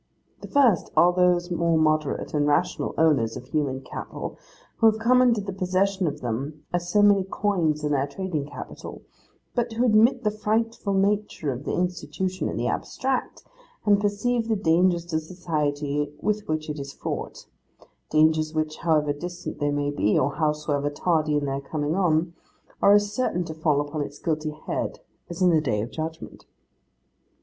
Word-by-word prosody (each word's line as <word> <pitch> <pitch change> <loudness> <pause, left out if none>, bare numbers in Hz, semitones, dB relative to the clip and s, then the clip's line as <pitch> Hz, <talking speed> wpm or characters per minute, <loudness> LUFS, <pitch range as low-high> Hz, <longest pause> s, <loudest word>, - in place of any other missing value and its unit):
The - - -8
first, 255 - +3
are 175 +1 +6
those 180 0 +2
more 170 -1 +2
moderate 155 -2 0
and 145 -1 +2
rational 145 - 0
owners 140 -9 +2
of 125 - -9
human 135 -1 -1
cattle, 135 - -7 0.4
who 225 - +5
have 220 0 +4
come 250 +3 +4
into 235 -4 +3
the 195 -1 -5
possession 190 0 0
of 150 0 -4
them 140 +6 -4
as 175 0 -1
so 205 +3 +4
many 200 -2 +5
coins 180 -6 0
in 150 - 0
their 140 -1 +1
trading 155 -2 -3
capital, 145 - -9 0.5
but 240 -1 -1
who 235 +3 +1
admit 225 +2 +4
the 210 - +2
frightful 215 -1 -1
nature 200 -6 0
of 130 +4 -8
the - - -2
Institution 180 0 -2
in - - -4
the 120 - -1
abstract, 260 - -2 0.4
and 205 -1 +4
perceive 225 +3 0
the 225 - +1
dangers 175 -2 +2
to 160 -2 -1
society 150 -4 -2
with 210 +3 -1
which 155 0 -2
it 150 -1 -4
is 140 0 -6
fraught: - - -5 0.6
dangers 155 0 +3
which 155 0 -1
however 150 -3 +1
distant 175 +4 -7
they 145 - +1
may 145 0 0
be, 105 -7 +1
or 140 +2 +1
howsoever 150 -2 0
tardy 155 0 +1
in 145 - -1
their 135 0 -2
coming 145 +2 -2
on, 170 -2 +1 0.5
are 200 - +6
as 205 0 +3
certain 215 -9 0
to 160 -2 -6
fall 155 -2 +1
upon 145 +1 -3
its 145 0 -5
guilty 155 -2 -2
head, - - -3 0.3
as 175 +2 -2
is 180 - +6
the 160 -2 +3
Day 110 -8 0
of 115 +4 -4
Judgment. 160 0 -6
160 Hz, 175 wpm, -25 LUFS, 150-195 Hz, 0.6 s, are